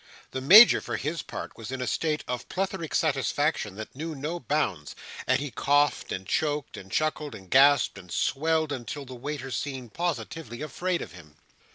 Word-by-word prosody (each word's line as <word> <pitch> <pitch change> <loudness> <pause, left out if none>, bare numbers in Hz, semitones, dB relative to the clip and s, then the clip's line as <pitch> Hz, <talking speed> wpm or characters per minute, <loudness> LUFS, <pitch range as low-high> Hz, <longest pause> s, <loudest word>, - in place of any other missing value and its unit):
The 130 - -4
Major, 205 - +9
for - - -3
his 155 +4 -3
part, - - -7
was 115 +2 -8
in 130 - -4
a 125 - -2
state 150 +2 -1
of 125 -1 -4
plethoric 190 -3 -3
satisfaction 145 - 0
that 110 +3 -8
knew 160 +3 -5
no 155 +5 -4
bounds: 110 - -2 0.3
and 130 +1 +3
he 145 -1 -4
coughed, 145 +3 +1
and 95 - -4
choked, 150 +7 -1
and 95 0 -11
chuckled, 155 +1 -1
and 95 -2 -12
gasped, 140 -5 +5
and 90 -3 -14
swelled, 155 +1 +1
until 140 +2 -5
the 130 - -9
waiters 135 +1 -5
seemed 130 -5 -5
positively 150 -5 -4
afraid 175 +3 -2
of - - -10
him. 80 -3 -14
145 Hz, 180 wpm, -27 LUFS, 120-155 Hz, 0.3 s, Major